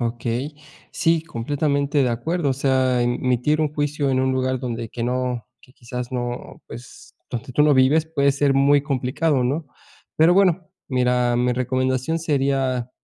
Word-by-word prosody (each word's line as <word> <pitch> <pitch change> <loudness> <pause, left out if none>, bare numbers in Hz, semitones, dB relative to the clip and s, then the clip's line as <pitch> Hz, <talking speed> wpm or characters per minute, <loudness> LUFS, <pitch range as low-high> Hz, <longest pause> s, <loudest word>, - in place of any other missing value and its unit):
Okey, 120 +4 -3 0.4
sí, 165 -2 +1
completamente 140 +1 -1
de 125 - +2
acuerdo, 145 +7 -1
o - - +2
sea, 130 -2 +1
emitir 125 +5 0
un 150 -1 0
juicio 145 -1 -1
en 130 0 +1
un 130 0 +1
lugar 130 0 0
donde 120 -2 -4
que 115 +1 -5
no, 125 -1 -2
que 125 - -21
quizás 125 +1 -6
no, 120 -1 -5
pues, 120 0 -12 0.2
donde 125 +2 -5
tú 150 - +3
no 150 -1 +5
vives, 145 +5 +3
puede 140 -2 +3
ser 140 -1 +1
muy 140 +1 +4
complicado, 140 0 0
¿no?, 145 +4 -1 0.5
pero 165 +3 +5
bueno, 185 -4 +2 0.2
mira, 125 -2 +1
mi 125 0 +1
recomendación 130 +4 -1
sería, 135 -5 0
130 Hz, 160 wpm, -22 LUFS, 125-145 Hz, 0.5 s, no